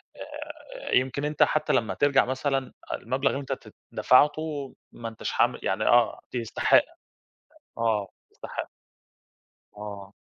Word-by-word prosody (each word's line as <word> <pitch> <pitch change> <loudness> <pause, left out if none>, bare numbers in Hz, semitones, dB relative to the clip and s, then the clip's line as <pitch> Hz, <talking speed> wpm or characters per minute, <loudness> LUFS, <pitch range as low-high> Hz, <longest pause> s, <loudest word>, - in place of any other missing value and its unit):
آآ، - - -8
يمكن 130 +3 +2
أنت 150 0 +3
حتى 155 0 +1
لمّا 115 - +1
ترجع 140 -1 +4
مثلًا، 130 +1 -1 0.2
المبلغ 135 +1 0
اللي 140 - -3
أنت 135 - -3
تت - - -10 0.2
دفعته 145 +1 +3 0.2
ما 115 -1 -6
أنتش 115 - -5
حام - - +2
يعني 95 +6 0
آه، 120 -1 +4
ت - - -8
يستحق، 115 -2 +4 1.0
آه، 110 -3 +1 0.2
تستحق. - - -6 1.1
آه. 100 -1 -8
130 Hz, 130 wpm, -27 LUFS, 115-145 Hz, 1.1 s, ترجع